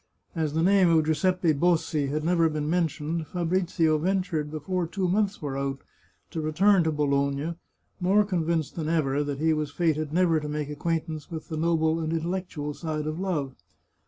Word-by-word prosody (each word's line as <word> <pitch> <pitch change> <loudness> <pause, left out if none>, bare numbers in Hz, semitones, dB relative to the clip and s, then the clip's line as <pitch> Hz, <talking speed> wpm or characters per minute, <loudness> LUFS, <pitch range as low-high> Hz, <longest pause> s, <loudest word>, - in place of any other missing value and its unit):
As 155 -3 -2
the 160 - +2
name 190 -1 +5
of 160 -2 +4
Giuseppe 165 +2 +2
Bossi 160 -2 +1
had 150 +2 -2
never 165 -1 +3
been 150 -1 -2
mentioned, 160 -1 -1
Fabrizio 170 -2 +1
ventured, 180 -3 -1
before 165 +4 -2
two 185 +2 -1
months 200 0 0
were 140 -2 -3
out, 135 0 -3 0.5
to 160 - -3
return 180 +5 +3
to 160 - +2
Bologna, 140 +1 0 0.5
more 195 +3 +3
convinced 170 -5 -1
than 160 -2 -3
ever 145 -3 +1
that 145 -1 -3
he 160 +2 +2
was 150 -1 -1
fated 155 -1 0
never 170 -1 +3
to 150 0 -5
make 150 -1 -3
acquaintance 155 0 -3
with 160 -2 -7
the 160 - -3
noble 160 0 +1
and 160 -1 -2
intel 170 +3 -1
lectual 150 -5 -6
side 155 -2 -3
of 155 +2 -3
love. 155 -9 -2
160 Hz, 180 wpm, -26 LUFS, 150-175 Hz, 0.5 s, name